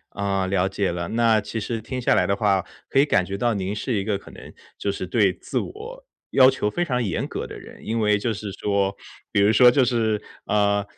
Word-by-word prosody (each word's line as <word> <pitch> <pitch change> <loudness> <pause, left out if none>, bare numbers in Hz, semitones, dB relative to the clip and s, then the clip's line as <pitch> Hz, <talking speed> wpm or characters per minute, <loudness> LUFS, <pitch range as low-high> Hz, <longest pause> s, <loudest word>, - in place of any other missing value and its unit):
啊， 100 -1 -1
了 95 0 +1
解 95 -1 -1
了， 85 0 -3
那 115 -1 +3
其 110 +2 -5
实 115 +2 -3
听 130 +3 -5
下 120 - +3
来 - - +3
的 100 - +1
话， 100 -3 +1 0.2
可 - - +1
以 140 - +6
感 105 -11 +2
觉 100 +1 -4
到 120 +1 +1
您 100 0 -2
是 120 +4 -3
一 100 - 0
个 105 -2 -1
可 - - -15
能， - - -12 0.2
就 100 - -2
是 95 -1 -4
对 100 -1 +2
自 - - -4
我， 470 +6 -8 0.3
要 130 -1 +7
求 130 -5 -1
非 175 +11 -1
常 125 -5 -1
严 95 - -2
格 - - -4
的 - - -9
人。 - - -13
因 115 +1 -1
为 105 -1 +3
就 115 +3 -1
是 100 +1 -6
说 100 0 0 0.4
比 100 - +2
如 105 +2 +5
说 125 +1 +7
就 130 0 +3
是， 110 -3 0 0.3
呃， 100 -1 +2
105 Hz, 255 characters per minute, -23 LUFS, 100-120 Hz, 0.4 s, 要